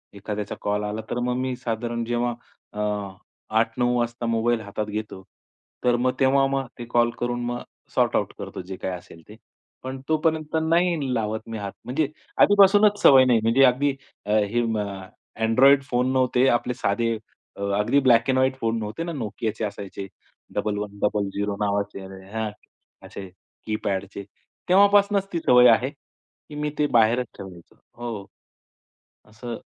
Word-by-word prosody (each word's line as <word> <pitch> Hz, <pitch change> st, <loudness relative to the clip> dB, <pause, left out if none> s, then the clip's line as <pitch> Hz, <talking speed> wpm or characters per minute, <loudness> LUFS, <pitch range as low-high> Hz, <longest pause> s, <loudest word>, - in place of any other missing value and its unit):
एखाद्याचा 105 Hz, +1 st, -5 dB
कॉल 105 Hz, 0 st, -1 dB
आला, 105 Hz, +1 st, -3 dB
तर 120 Hz, -, -2 dB
मग 125 Hz, 0 st, -1 dB
मी 130 Hz, 0 st, -2 dB
साधारण 120 Hz, -1 st, -3 dB
जेव्हा 120 Hz, 0 st, -1 dB, 0.4 s
अ, 105 Hz, -, -7 dB, 0.8 s
8:00-9:00 120 Hz, +2 st, +2 dB
वाजता 120 Hz, 0 st, -2 dB
मोबाईल 115 Hz, 0 st, +1 dB
हातात 105 Hz, 0 st, -4 dB
घेतो, 105 Hz, -2 st, -5 dB, 0.6 s
तर 125 Hz, -1 st, +3 dB
मग 125 Hz, +1 st, +1 dB
तेव्हा 135 Hz, 0 st, +4 dB
मग 135 Hz, -1 st, -2 dB
ते 120 Hz, -, -5 dB
कॉल 120 Hz, 0 st, +3 dB
करून 120 Hz, 0 st, -2 dB
मग 120 Hz, 0 st, -3 dB, 0.3 s
सॉर्ट -, -, +2 dB
आउट -, -, 0 dB
करतो, -, -, -6 dB
जे 95 Hz, +1 st, -7 dB
काही 95 Hz, -, -4 dB
असेल 85 Hz, -1 st, -15 dB
ते. 105 Hz, -, -11 dB, 0.5 s
पण 130 Hz, +1 st, -5 dB
तोपर्यंत 155 Hz, 0 st, 0 dB
नाही 165 Hz, -4 st, +1 dB
लावत 110 Hz, -2 st, -1 dB
मी 115 Hz, -, -4 dB
हात. 100 Hz, -2 st, -5 dB
म्हणजे 140 Hz, +4 st, 0 dB, 0.3 s
आधीपासूनच 205 Hz, +1 st, +6 dB
सवय 135 Hz, -6 st, +8 dB
नाही. 120 Hz, -3 st, +4 dB
म्हणजे 115 Hz, +4 st, +4 dB
अगदी 135 Hz, +3 st, +3 dB, 0.4 s
हे 105 Hz, +2 st, +2 dB
अ, 105 Hz, -4 st, -3 dB, 0.4 s
Android 135 Hz, +5 st, +5 dB
फोन 125 Hz, 0 st, +1 dB
नव्हते, 130 Hz, 0 st, +3 dB
आपले 120 Hz, 0 st, +1 dB
साधे 115 Hz, +1 st, 0 dB, 0.4 s
अ, -, -, -8 dB, 0.2 s
अगदी 120 Hz, +7 st, +3 dB
ब्लॅक 120 Hz, -3 st, +4 dB
अँड 130 Hz, -, +3 dB
व्हाईट 130 Hz, 0 st, +2 dB
फोन 115 Hz, 0 st, 0 dB
नव्हते 110 Hz, +8 st, -4 dB
ना, 170 Hz, -, -4 dB
Nokiaचे 110 Hz, +1 st, -3 dB
असायचे 100 Hz, -1 st, -7 dB, 0.5 s
1100 100 Hz, -1 st, -2 dB
नावाचे 100 Hz, -1 st, -1 dB, 1.0 s
असे 95 Hz, -, -8 dB, 0.4 s
की-पॅडचे, 100 Hz, -2 st, -3 dB, 0.5 s
तेव्हापासूनच 200 Hz, +1 st, +4 dB
ती 170 Hz, -, 0 dB
सवय 125 Hz, -5 st, +6 dB
आहे, 120 Hz, +3 st, +3 dB
की 145 Hz, +1 st, -19 dB
मी 150 Hz, 0 st, -2 dB
ते 150 Hz, -, +3 dB
बाहेरच 120 Hz, 0 st, +3 dB
ठेवायचो 90 Hz, -3 st, -11 dB, 0.2 s
हो. 115 Hz, -5 st, -6 dB, 1.1 s
असं 115 Hz, +2 st, -8 dB
120 Hz, 145 wpm, -24 LUFS, 105-130 Hz, 1.1 s, सवय